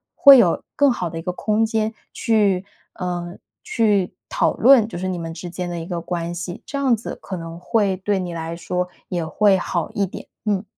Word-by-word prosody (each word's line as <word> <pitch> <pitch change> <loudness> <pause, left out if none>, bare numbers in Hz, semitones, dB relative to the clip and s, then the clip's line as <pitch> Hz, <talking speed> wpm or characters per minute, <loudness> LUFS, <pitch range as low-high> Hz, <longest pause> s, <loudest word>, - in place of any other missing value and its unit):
会 280 -2 +9
有 185 -9 +3
更 285 -2 +4
好 180 -8 -2
地 165 - -7
一 - - -5
个 180 - -2
空 215 +4 +1
间 220 0 -1 0.2
去 205 -5 +2 0.3
呃， 175 -1 -4 0.3
去 205 -5 +1 0.2
讨 - - +1
论 245 -3 +6
就 225 - -7
是 185 - -2
你 185 -1 -2
们 165 -1 -5
之 175 +1 -7
间 180 +1 -4
的 175 -1 -4
一 165 - -6
个 175 -2 -3
关 170 0 -3
系， 175 0 -6
这 280 - -5
样 270 -4 +3
子 225 - -7
可 190 - -6
能 165 0 -8
会 200 0 +1
对 195 +1 0
你 180 -2 -4
来 165 0 -4
说 180 +2 -3 0.2
也 175 -3 -2
会 195 +5 +3
好 175 -2 -2
一 200 - +1
点， 185 - -9 0.2
嗯。 205 -2 0
185 Hz, 230 characters per minute, -21 LUFS, 175-215 Hz, 0.3 s, 会